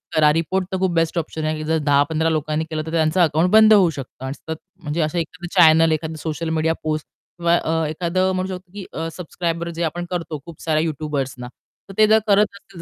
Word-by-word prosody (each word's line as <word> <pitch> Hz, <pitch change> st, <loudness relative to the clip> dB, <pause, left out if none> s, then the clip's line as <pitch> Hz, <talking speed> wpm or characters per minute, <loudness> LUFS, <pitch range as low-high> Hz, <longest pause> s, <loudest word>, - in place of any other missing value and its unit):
करा. 150 Hz, -1 st, +5 dB
रिपोर्ट 175 Hz, +4 st, 0 dB
तर 190 Hz, -, -1 dB
खूप 185 Hz, -1 st, +1 dB
बेस्ट 165 Hz, +1 st, +1 dB
ऑप्शन 160 Hz, -1 st, -4 dB
आहे 155 Hz, -, 0 dB
की 155 Hz, -, -5 dB
जर 160 Hz, +1 st, +1 dB
10-15 145 Hz, +3 st, +2 dB
लोकांनी 155 Hz, 0 st, -1 dB
केलं 155 Hz, -1 st, -3 dB
तर 160 Hz, -, -6 dB
त्यांचं 160 Hz, +1 st, +1 dB
अकाउंट 160 Hz, +2 st, +3 dB
बंद 220 Hz, 0 st, +7 dB
होऊ 190 Hz, -5 st, +6 dB
शकतं. 135 Hz, -3 st, -8 dB
आणि 130 Hz, -, -3 dB
सतत 160 Hz, +2 st, -7 dB, 0.3 s
म्हणजे 155 Hz, +2 st, -2 dB
असं 155 Hz, +2 st, -1 dB
एखादं 170 Hz, +1 st, -6 dB
चॅनल 160 Hz, -1 st, +6 dB
एखादं 160 Hz, +1 st, -2 dB
सोशल 160 Hz, +1 st, -3 dB
मीडिया 160 Hz, 0 st, +1 dB
पोस्ट 155 Hz, -1 st, -2 dB
अ, -, -, -63 dB, 0.3 s
किंवा 165 Hz, -2 st, +2 dB
एखादं 180 Hz, +4 st, 0 dB
म्हणू 185 Hz, +1 st, -2 dB
शकतो 180 Hz, 0 st, -13 dB
की 205 Hz, -2 st, -7 dB
अ, 165 Hz, +1 st, -3 dB
सबस्क्रायब 170 Hz, -1 st, -3 dB
जे 170 Hz, 0 st, -4 dB
आपण 175 Hz, +2 st, -2 dB
करतो 165 Hz, -4 st, -3 dB
खूप 170 Hz, -3 st, -12 dB
साऱ्या 155 Hz, -1 st, +1 dB
यूट्यूबर्सना 140 Hz, -5 st, -3 dB, 0.4 s
तर 195 Hz, -, -8 dB
ते 215 Hz, 0 st, +6 dB
जर 220 Hz, +1 st, +5 dB
करत 205 Hz, +1 st, +5 dB
असतील. 195 Hz, -3 st, -13 dB
160 Hz, 220 wpm, -21 LUFS, 155-175 Hz, 0.4 s, बंद